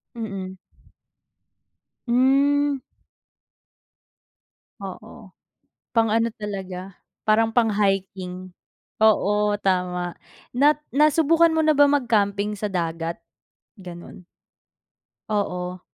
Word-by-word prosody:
Mm. 195 -5 -6 1.5
Hmm. 275 +3 +3 2.0
Oo, - - -10 0.6
pang 225 -1 +3
ano 230 +1 +2
talaga, 195 -2 -6 0.3
parang 220 +1 +3
pang-hiking, 195 -5 -1 0.5
oo, 210 -1 +3
tama, 180 -3 -1 0.4
nat 290 +4 +4 0.2
nasubukan 320 +3 +4
mo 320 -1 +1
na 310 - +4
ba 290 0 +5
mag 285 -3 +1
camping 205 -2 +1
sa 210 0 -4
dagat, 165 -2 -3 0.6
ganon? 175 0 -11 1.1
Oo. 180 -3 -2
210 Hz, 80 wpm, -23 LUFS, 185-250 Hz, 2.0 s, ba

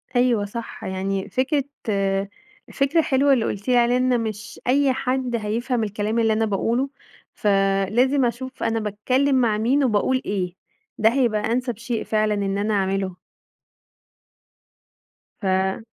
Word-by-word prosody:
أيوه 245 -4 +3
صح، 230 +3 -7
يعني 190 +1 -3
فكرة 275 +2 +1 0.3
آآ 195 -1 0 0.5
فكرة 280 +4 +2
حلوة 275 -1 +3
اللي 235 -4 +1
قُلتِ 200 +3 -4
لي 250 -1 +4
عليها 240 +1 +3
إن 250 -2 +2
مش 215 0 -6
أي 270 +1 +3
حد 255 -1 -1
هيفهَم 230 +2 -1
الكلام 210 +2 -1
اللي 225 -1 +3
أنا 220 +1 +1
باقوله، 230 +6 0 0.4
فلازم 205 +7 +2
أشوف 255 +2 -4
أنا 225 0 +1
باتكلم 250 +7 +1
مع 220 -3 +2
مين 260 +6 +2
وباقول 255 +3 +1
إيه. 185 -3 -2 0.4
ده 220 +1 +5
هيبقى 240 -5 +2
أنسب 245 -2 -1
شيء 235 0 -3
فعلًا 215 -1 +1
إن 200 -1 -1
أنا 210 +1 0
أعمله. 195 -1 0 2.3
ف 200 - -5
امم. 190 +3 0
225 Hz, 145 wpm, -23 LUFS, 205-255 Hz, 2.3 s, ده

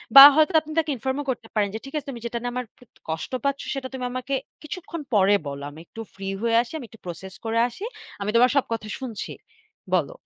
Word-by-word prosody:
বা 275 - +15
হয়তো 310 +1 +4
আপনি 310 0 -10
তাকে 320 -2 +2
ইনফর্মও 265 +4 -2
করতে 235 -3 -2
পারেন 205 -2 +2
যে, 220 - -2
"ঠিক 275 - -10
আছে, 295 -1 -5
তুমি 240 -3 -6
যেটা 235 0 -2
নিয়ে 245 0 -2
আমার 250 -1 -2
প - - -27 0.3
কষ্ট 160 +8 -3
পাচ্ছো, 280 0 0
সেটা 265 -1 -3
তুমি 255 -1 -3
আমাকে 255 +2 -3 0.3
কিছুক্ষণ 335 0 -6
পরে 200 -1 +5
বলো। 140 0 -5
আমি 150 +2 -12
একটু 225 - -9
ফ্রি 195 0 -6
হয়ে 230 0 +2
আসি, 240 - -8
আমি 275 - -7
একটু 225 - -16
প্রসেস 180 +2 -7
করে 225 +1 0
আসি। 245 - -9 0.4
আমি 200 - -1
তোমার 245 +2 +7
সব 280 - +4
কথা 215 -1 -4
শুনছি, 245 -6 -5 0.6
বলো।" - - +2
245 Hz, 230 wpm, -25 LUFS, 210-275 Hz, 0.6 s, বা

